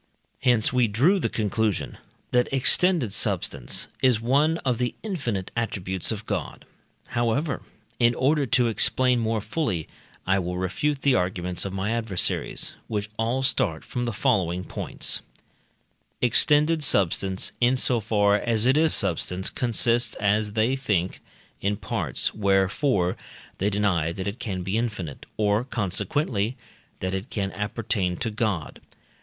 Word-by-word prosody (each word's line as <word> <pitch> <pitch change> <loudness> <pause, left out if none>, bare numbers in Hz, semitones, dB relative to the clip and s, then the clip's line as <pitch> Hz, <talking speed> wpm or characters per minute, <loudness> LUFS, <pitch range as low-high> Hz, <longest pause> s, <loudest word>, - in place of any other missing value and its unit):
Hence 120 -2 +3
we 125 -2 +3
drew 140 - +3
the - - 0
conclusion 110 -1 -1 0.3
that 125 0 +2
extended 135 - +3
substance - - 0
is 125 -4 +4
one 145 +7 +2
of 125 -3 +1
the 125 -1 -1
infinite 125 - -3
attributes 95 -6 -2
of 110 0 -5
God. 100 -9 -4 0.4
However, 120 +6 0 0.4
in 120 0 +4
order 140 +1 +2
to 125 -3 +3
explain 125 +2 +2
more 110 -1 0
fully, 105 - -2 0.4
I 95 +1 +2
will 90 0 -3
refute 135 +10 -1
the 140 - +4
arguments 90 -1 0
of 95 - -4
my 95 +3 -2
adversaries, 110 -6 0
which 105 -1 -3
all 120 +4 0
start 85 -10 0
from 120 -1 -3
the 120 - -1
following 90 -4 +1
points: - - -2 1.0
Extended 150 +6 +3
substance, 95 -4 +1
in 120 +2 +4
so 125 -1 +1
far 105 -1 +2
as 115 0 +1
it 130 +3 +4
is 160 0 +4
substance, 95 -1 +1
consists, 120 0 +1
as 105 +1 +1
they 110 +4 +2
think, 105 -9 -1 0.4
in 100 +1 0
parts, - - -2
wherefore 95 0 +1 0.4
they 100 - +1
deny 95 -6 +1
that 95 +2 -5
it 100 +5 -4
can 95 -7 -4
be 95 +5 0
infinite, 105 -11 -4
or 105 +1 +2
consequently, 115 - -1 0.4
that 95 0 -2
it 95 +5 -4
can 100 -2 -2
appertain 105 -3 -1
to 115 - -2
God. 105 -7 -2
110 Hz, 140 wpm, -25 LUFS, 95-125 Hz, 1.0 s, is